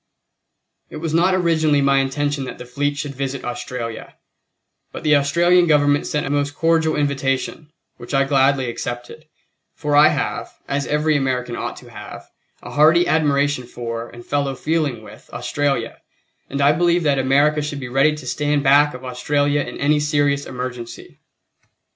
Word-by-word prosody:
It - - -10
was 160 0 -4
not 180 +3 +3
originally 160 -5 +2
my 140 0 +3
intention 140 +1 -1
that - - -7
the 125 - -9
fleet 145 +3 -2
should 145 -2 -4
visit 135 0 -4
Australia, 120 -2 -6 0.8
but - - -8
the 150 -1 +4
Australian 170 +5 +3
Government 145 -2 +3
sent 150 - -1
a 135 - -3
most 145 0 -1
cordial 165 -1 +2
invitation, 140 +1 -2 0.3
which 120 - -10
I 135 0 +3
gladly 135 -1 +2
accepted; 120 +5 -6 0.5
for 150 -2 -1
I 150 +1 +8
have, - - -2 0.2
as 140 -1 -2
every 150 +1 +1
American 125 -3 -1
ought - - -4
to - - -14
have, - - -10 0.4
a - - -9
hearty 160 +4 +5
admiration 145 -4 +1
for, 115 -1 -6
and 120 0 -13
fellow 140 -1 -1
feeling 150 -6 -1
with, 105 - -14
Australia, 125 0 -2 0.5
and 140 +1 -3
I 140 +1 +5
believe 170 +2 +2
that 140 -3 +2
America 145 +3 +2
should 145 -1 -4
be 130 - -6
ready 135 +4 +2
to 150 -3 -10
stand 145 +2 0
back 145 +1 +4
of 125 +1 -10
Australia 145 +3 0
in 125 - -6
any 150 +1 +2
serious 145 -1 0
emergency. 125 -2 -7
145 Hz, 165 wpm, -20 LUFS, 130-150 Hz, 0.8 s, I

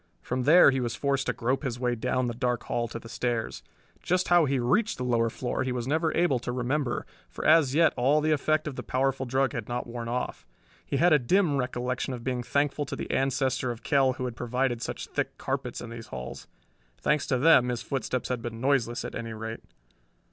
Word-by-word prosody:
From 125 0 -2
there 160 0 +8
he 135 - 0
was 120 -1 -2
forced 140 -1 0
to - - +1
grope 125 +3 -1
his 120 -4 -3
way 125 -1 +1
down 125 +2 0
the 120 - -2
dark 125 0 -1
hall 120 0 -1
to 115 - -6
the 115 - -10
stairs. 120 -1 -2 0.4
Just 180 +1 0
how 175 -2 +6
he 135 -1 +1
reached 140 - +1
the 125 - -3
lower 115 -2 +2
floor 125 +3 -3
he 130 0 -1
was 125 -1 -3
never 160 +3 +1
able 165 -7 +3
to 125 - -4
remember, 125 +1 -1 0.2
for - - -7
as 155 -4 +5
yet 165 0 +5
all 135 +5 +3
the 155 +1 +1
effect 155 +1 +1
of 145 - -4
the - - -4
powerful 135 0 -1
drug 130 0 +1
had 115 -1 -5
not 120 0 -2
worn 120 -1 -6
off. 120 - -3 0.4
He 140 - -2
had 175 +3 +5
a 150 - +6
dim 160 +4 +2
recollection 125 0 -2
of 120 - -9
being 125 -1 -1
thankful 145 +3 0
to - - -4
the - - -5
ancestor 130 -1 0
of 120 -2 -6
Kell 135 -3 +3
who 130 0 -4
had 125 -2 -4
provided 125 0 -1
such - - -4
thick - - -3
carpets - - -3
in 120 - -8
these 115 -1 -8
halls. 65 -1 -7 0.5
Thanks 150 -1 0
to 130 - +1
them 130 -3 +5
his 120 -1 -3
footsteps 130 -2 -2
had 125 -2 -2
been 115 -1 -6
noiseless, 125 -3 +1
at - - -6
any 115 -1 -5
rate. 110 +1 -6
130 Hz, 225 wpm, -27 LUFS, 120-140 Hz, 0.5 s, there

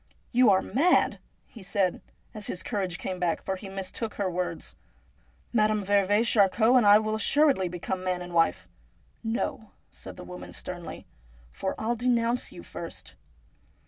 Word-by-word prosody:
' - - -38
You 250 -2 +5
are 190 -1 +4
mad 330 +8 +2
!' - - -41
he 225 - -10
said, 190 -1 0 0.3
as 210 -2 -4
his 180 - -4
courage 190 -6 -2
came 185 -1 -5
back, 175 -2 0
for 190 - -1
he 195 +1 -9
mistook 195 +3 -4
her 195 -3 -1
words. 175 -1 -4 0.4
' - - -36
Madame 215 -2 +2
veuve 205 +2 +3
Charcot 220 +3 +4
and 240 -5 +5
I 205 +1 +9
will 215 0 -1
assuredly 240 - +3
become 180 +1 -4
man 180 -1 -1
and 175 0 -9
wife.' 165 - +2 0.4
' - - -37 0.2
No,' 220 -2 -3 0.2
said - - -10
the 180 - -8
woman 180 0 -9
sternly, 175 -2 -6 0.2
' - - -26
for 190 - -1
I'll 230 +2 0
denounce 240 0 0
you - - -10
first.' - - -8
195 Hz, 175 wpm, -27 LUFS, 180-220 Hz, 0.4 s, I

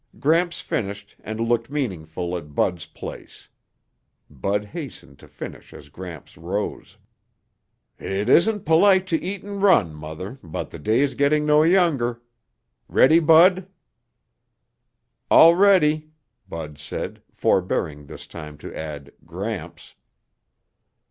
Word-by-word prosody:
Gramps 170 +4 +2
finished 100 -1 -4
and 110 +1 -6
looked 115 +1 0
meaningfully 90 - -3
at 75 -3 -15
Bud's 85 -4 0
place. - - -11 0.8
Bud 100 +9 -2
hastened 135 - -9
to - - -15
finish - - -10
as 75 - -13
Gramps 85 +1 -10
rose. 95 +5 -5 1.0
"It 100 +3 -3
isn't 205 - +3
polite 185 +4 +5
to 165 - 0
eat 190 +2 -5
and 200 -1 -6
run, 180 - +4
Mother, 80 - -8
but 80 -3 -6
the - - -9
day's 120 - +1
getting 150 +2 +2
no 150 0 +5
younger. 155 -9 +2 0.7
Ready, 155 +6 +5
Bud?" 175 +4 +5 1.6
"All 165 +1 +8
ready," 155 -6 +3 0.4
Bud 75 -3 -7
said, 80 +2 -6
forebearing 75 -5 -1
this - - -10
time 75 -3 -10
to - - -10
add 75 -3 -7 0.2
"Gramps." 90 -1 -6
115 Hz, 115 wpm, -23 LUFS, -, 1.6 s, All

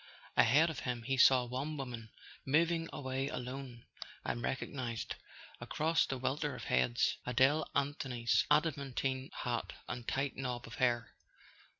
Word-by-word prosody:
Ahead 150 +8 +5
of 160 - -6
him 120 -2 -3
he 135 +4 0
saw 130 -1 +6
one 135 +5 -3
woman 120 -5 -6 0.3
moving 165 +3 +2
away 130 0 -2
alone, 125 -2 -6 0.4
and 120 - -2
recognized, 125 -2 -3 0.5
across 160 +2 +1
the 135 - -2
welter 140 +3 -1
of - - -8
heads, 65 -1 +2
Adele 130 +5 +3
Anthony's 135 -4 +1
adamantine 135 -3 +1
hat 120 -2 -3
and 120 -1 -5
tight 135 +1 -1
knob 125 -2 -3
of 115 - -10
hair. 120 -3 +1
130 Hz, 130 wpm, -34 LUFS, 120-140 Hz, 0.5 s, saw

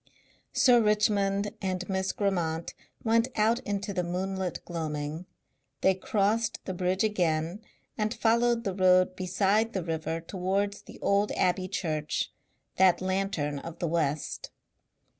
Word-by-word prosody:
Sir 250 -4 +5
Richmond 205 -1 +2
and 185 -1 -2
Miss 190 -1 0
Grammont 170 -5 -1 0.3
went 230 +1 +3
out 225 +3 +3
into 200 0 -3
the 180 -2 0
moonlit 185 +1 -3
gloaming; 155 0 -4 0.5
they 190 - +5
crossed 210 +4 0
the 185 - -3
bridge 185 +2 0
again 175 -2 0 0.4
and 215 0 +1
followed 235 0 +2
the 195 - -2
road 185 -1 +4
beside 195 +4 +1
the 190 - -2
river 160 0 -2
towards 195 +4 -2
the - - -13
old 200 +1 +2
Abbey 185 0 +1
Church, 155 -6 -2 0.5
that 185 -2 +5
Lantern 185 -6 -1
of 165 +3 -8
the 170 - -1
West. 155 -3 -1
190 Hz, 130 wpm, -28 LUFS, 175-205 Hz, 0.5 s, Sir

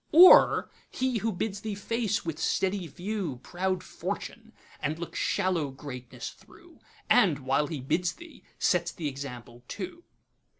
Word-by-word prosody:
Or 355 +4 +8 0.2
he 255 -3 -1
who 225 +2 0
bids 200 +1 -3
thee 215 -2 -3
face 215 0 -1
with 165 -2 -4
steady 190 -2 0
viewProud 180 - -3
Fortune, - - -6 0.3
and 155 +2 -2
look 170 0 -7
shallow 175 -6 0
Greatness 125 -3 -8
thro',And, 145 - -1
while 135 +2 +1
he 150 -4 -5
bids 170 +6 0
thee, 330 -5 -14 0.2
sets 175 -2 +2
th' 170 - -15
example 130 -5 -6
too? 200 - -6
175 Hz, 130 wpm, -28 LUFS, 140-205 Hz, 0.3 s, Or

